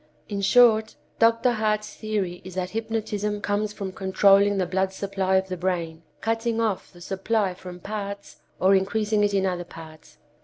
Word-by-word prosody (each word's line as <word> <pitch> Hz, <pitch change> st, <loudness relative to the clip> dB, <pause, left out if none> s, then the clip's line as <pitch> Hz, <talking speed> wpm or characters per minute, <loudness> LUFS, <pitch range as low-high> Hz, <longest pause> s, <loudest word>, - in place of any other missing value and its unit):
In 200 Hz, -2 st, -3 dB
short, 220 Hz, +1 st, +5 dB, 0.2 s
Dr. 230 Hz, +2 st, +4 dB
Hart's 215 Hz, -2 st, -1 dB
theory 200 Hz, -5 st, -3 dB
is 185 Hz, 0 st, -10 dB
that 185 Hz, -1 st, -2 dB
hypnotism 210 Hz, -2 st, -2 dB
comes 205 Hz, +1 st, -1 dB
from 200 Hz, -2 st, -5 dB
controlling 195 Hz, +1 st, +4 dB
the 185 Hz, -, +1 dB
blood 190 Hz, +2 st, 0 dB
supply 190 Hz, -1 st, -1 dB
of 190 Hz, 0 st, +2 dB
the 185 Hz, -, -3 dB
brain, 170 Hz, -3 st, -2 dB, 0.2 s
cutting 225 Hz, 0 st, -1 dB
off 220 Hz, -4 st, -1 dB
the 175 Hz, -, -16 dB
supply 195 Hz, +2 st, -1 dB
from 180 Hz, 0 st, -10 dB
parts 200 Hz, +1 st, -6 dB, 0.2 s
or 190 Hz, +1 st, +4 dB
increasing 210 Hz, +2 st, +1 dB
it 205 Hz, -1 st, +1 dB
in 195 Hz, -1 st, +2 dB
other 180 Hz, -2 st, -1 dB
parts. 160 Hz, -2 st, -13 dB
200 Hz, 165 wpm, -25 LUFS, 185-215 Hz, 0.2 s, short